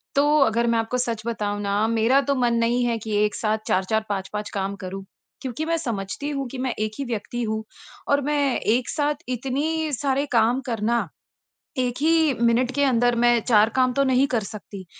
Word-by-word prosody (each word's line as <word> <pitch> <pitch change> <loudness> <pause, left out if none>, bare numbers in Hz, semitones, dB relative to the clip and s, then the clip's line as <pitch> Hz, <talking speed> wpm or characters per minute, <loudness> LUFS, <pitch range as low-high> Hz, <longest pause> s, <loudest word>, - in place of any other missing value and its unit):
तो 280 - +4 0.2
अगर, 235 +2 +1
मैं 230 0 +2
आपको 225 +3 -1
सच 230 -3 -2
बताऊँ 205 -3 -2
न 205 +3 +1
मेरा 230 +4 +3
तो 280 - +3
मन 240 -2 +2
नहीं 240 +2 +2
है 235 -1 0
कि 215 -2 -2
एक 210 - -2
साथ 215 0 0
4-4 215 +4 +1
5-5 205 +1 -3
काम 195 +1 -2
करूँ। 195 +1 -6 0.4
क्योंकि 265 +4 -4
मैं 330 0 0
समझती 225 +5 -3
हूँ 275 - -2
कि 265 - -7
मैं 250 - -1
एक 215 - -4
ही - - -1
व्यक्ति 230 +3 -3
हूँ 220 0 -2 0.5
और 285 - +3
मैं 295 0 +1 0.3
एक 245 0 0
साथ 295 -1 -1
इतनी 300 +5 -1
सारे 280 0 0
काम 230 +3 +3
करना 230 0 0 0.8
1 250 -1 0
ही 320 -2 +3 0.2
मिनट 245 +2 +1
के 285 - +3
अंदर 245 -2 +3
मैं 240 -1 +5
4 215 -1 +5
काम 255 -1 +3
तो - - +5
नहीं 255 +2 +4
कर 235 -4 0
सकती। 200 -2 -9
235 Hz, 195 wpm, -23 LUFS, 215-270 Hz, 0.8 s, मैं